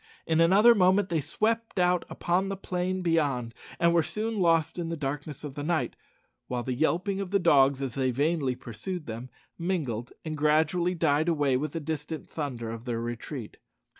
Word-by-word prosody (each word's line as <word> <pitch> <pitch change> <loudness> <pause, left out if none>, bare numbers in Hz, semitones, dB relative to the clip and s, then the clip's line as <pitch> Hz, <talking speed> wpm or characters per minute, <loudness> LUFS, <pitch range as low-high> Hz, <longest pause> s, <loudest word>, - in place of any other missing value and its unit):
In 160 0 +2
another 200 +8 +7
moment 190 -1 +3
they 165 -3 +1
swept 225 +8 -1
out 180 -1 +2
upon 185 +3 0
the 195 - -3
plain 185 0 -2
beyond, 140 -9 +1 0.3
and 170 0 +4
were 170 - +5
soon 215 +6 -2
lost 165 -1 +2
in 165 -1 -3
the 165 - -3
darkness 145 +1 -4
of 145 -3 -6
the 145 - -5
night, 160 +2 -1 0.5
while 125 -1 -2
the 130 - -2
yelping 175 - 0
of 195 - -4
dogs, 140 -4 +4
as 130 -3 -3
they 130 0 0
vainly 140 0 0
pursued 150 - -6
them, 115 +3 -6 0.3
mingled 145 - -2
and 155 -1 -3
gradually 160 +4 +2
died 155 0 +2
away 145 -5 +2
with 145 +3 -2
the 165 - -2
distant 155 0 -5
thunder 125 -7 -4
of 115 +1 -8
their 120 -2 -2
retreat. 120 +1 -6
160 Hz, 180 wpm, -28 LUFS, 135-180 Hz, 0.5 s, another